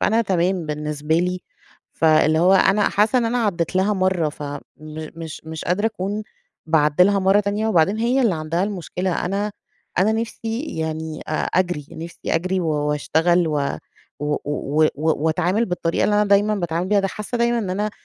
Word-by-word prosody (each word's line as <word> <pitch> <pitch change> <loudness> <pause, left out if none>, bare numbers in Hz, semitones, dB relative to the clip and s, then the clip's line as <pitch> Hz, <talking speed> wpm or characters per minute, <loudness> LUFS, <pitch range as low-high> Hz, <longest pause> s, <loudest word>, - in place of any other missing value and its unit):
فأنا 225 +2 +2
تمام 185 -3 0
بالنسبة 150 0 -2
لي. 180 +2 0 0.5
فاللي 155 -1 +3
هو 180 +3 +5
أنا 195 +2 +4
حاسّة 215 +5 +2
إن 235 - +1
أنا 235 +2 0
عدّيت 175 -3 -1
لها 190 +3 +2
مرّة 185 -4 +1
فمش 155 +2 -8
مش 160 0 -6
قادرة 205 +5 +1
أكون 210 0 -3 0.4
باعدّي 155 +1 +4
لها 200 +1 +3
مرّة 195 +2 +4
تانية، 210 +2 -1
وبعدين 195 +2 +2
هي 250 +3 +2
اللي 210 -7 +2
عندها 160 +3 -1
المشكلة. 185 -2 -3
أنا 200 +3 -2 0.5
أنا 210 +4 +4
نفسي 225 - -4
يعني 160 0 -4
أ - - -3
أجري. 175 -2 0
نفسي 165 +1 -8 0.2
أجري 185 +3 0
و 170 - -2
واشتغل 155 +3 +1
و 145 -2 -1 0.4
و 150 0 0
و 150 +1 +1
وأتعامل 160 +7 +1
بالطريقة 175 -2 -1
اللي 210 - +2
أنا 210 0 +4
دايمًا 205 +1 +3
باتعامل 175 -2 -2
بيها. 205 0 +3
ده 195 - -1
حاسّة 210 +4 -5
دايمًا 235 0 +2
إن 195 -5 -2
أنا 210 +3 -1
180 Hz, 170 wpm, -21 LUFS, 160-205 Hz, 0.5 s, هو